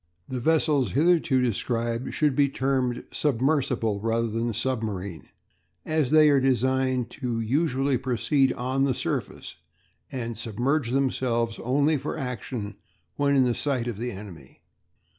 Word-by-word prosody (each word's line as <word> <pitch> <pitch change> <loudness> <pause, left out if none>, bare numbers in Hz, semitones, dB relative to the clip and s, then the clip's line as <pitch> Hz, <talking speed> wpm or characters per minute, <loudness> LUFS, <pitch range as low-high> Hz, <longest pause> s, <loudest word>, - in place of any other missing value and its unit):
The 130 - -4
vessels 150 -1 +2
hitherto 155 -3 +3
described 115 +1 -1
should 150 -3 +2
be 140 0 +3
termed 130 -2 -1
submersible 130 -6 0
rather 115 +2 0
than 115 +1 -1
submarine, 105 -7 -3 0.6
as 155 -4 +1
they 155 0 +6
are 140 - +4
designed 130 -1 +1
to 120 -3 -1
usually 135 +2 +1
proceed 130 +2 +1
on 130 +2 -1
the 130 -3 0
surface, - - -4 0.5
and 120 -4 -4
submerge 120 +5 -1
themselves 125 -3 0
only 145 +5 +2
for 140 +3 -4
action 120 -5 -5 0.4
when 140 0 +2
in 125 -3 +3
sight 130 -2 -1
of 120 -4 -3
the 120 +1 -2
enemy. 95 -9 -11
130 Hz, 130 wpm, -26 LUFS, 115-140 Hz, 0.6 s, they